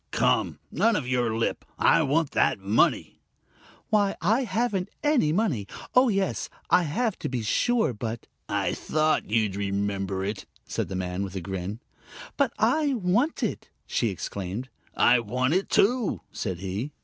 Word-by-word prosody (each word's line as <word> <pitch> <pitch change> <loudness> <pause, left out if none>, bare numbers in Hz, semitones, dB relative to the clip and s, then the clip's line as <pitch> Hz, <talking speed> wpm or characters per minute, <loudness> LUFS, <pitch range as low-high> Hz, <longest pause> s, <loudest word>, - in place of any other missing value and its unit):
"Come! - - +1
None 230 -1 +3
of 140 -9 -2
your 120 -3 0
lip. 115 - -1
I - - +4
want 155 +2 +1
that 130 - +2
money!" 100 +3 +1 0.7
"Why, 205 -2 +3
I 225 +10 +2
haven't 205 -3 -1
any 290 - +3
money! 155 - 0 0.3
Oh, 250 0 +5
yes, 195 -2 -1 0.2
I - - +6
have, 210 +8 -1
to - - -3
be 125 -3 -2
sure, 225 - +2
but 115 +1 -5 0.2
" - - -47 0.2
"I - - 0
thought 155 -5 0
you'd 105 -3 +1
remember 100 -1 -2
it," 105 0 -4 0.2
said - - -3
the 95 - -5
man, 90 0 -3
with 95 -1 -6
a - - -1
grin. 95 +4 -5 0.5
"But - - +2
I 300 -3 +2
want 225 - +1
it!" - - -3 0.2
she 115 - 0
exclaimed. 100 +5 -5 0.3
"I 120 0 +5
want 125 +5 0
it, 190 +2 0
too!" 240 +1 +2
said 95 -5 -4
he. 100 +10 -4
125 Hz, 160 wpm, -26 LUFS, -, 0.7 s, I